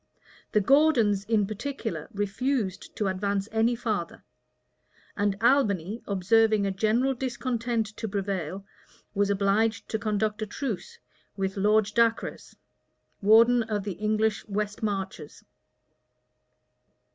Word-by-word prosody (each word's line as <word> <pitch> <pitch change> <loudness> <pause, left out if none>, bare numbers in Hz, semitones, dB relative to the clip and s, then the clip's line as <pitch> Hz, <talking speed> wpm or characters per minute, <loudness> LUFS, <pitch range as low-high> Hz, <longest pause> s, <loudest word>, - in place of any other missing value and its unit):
The 210 - +4
Gordons, 235 -6 +3
in 215 -1 +2
particular, 225 +3 -5
refused 205 0 -2
to 210 - -1
advance 195 +1 -1
any 225 +2 +2
farther; 215 -8 -3 0.9
and 205 -1 0
Albany, 220 - +2
observing 215 +2 +3
a 195 - 0
general 225 +7 +1
discontent 240 -2 -2
to 225 - -3
prevail 195 -2 -3 0.5
was 205 -1 +1
obliged 205 +2 +1
to 220 - -1
conclude 215 0 -1
a 215 - -2
truce 220 -3 -5 0.4
with 195 0 -2
Lord 210 +2 +3
Dacres, 230 0 0 0.7
warden 230 +4 +6
of 215 -3 -2
the 200 - -3
English 215 +3 0
west 210 0 -3
marches. 190 -7 -4
215 Hz, 110 wpm, -27 LUFS, 200-230 Hz, 0.9 s, warden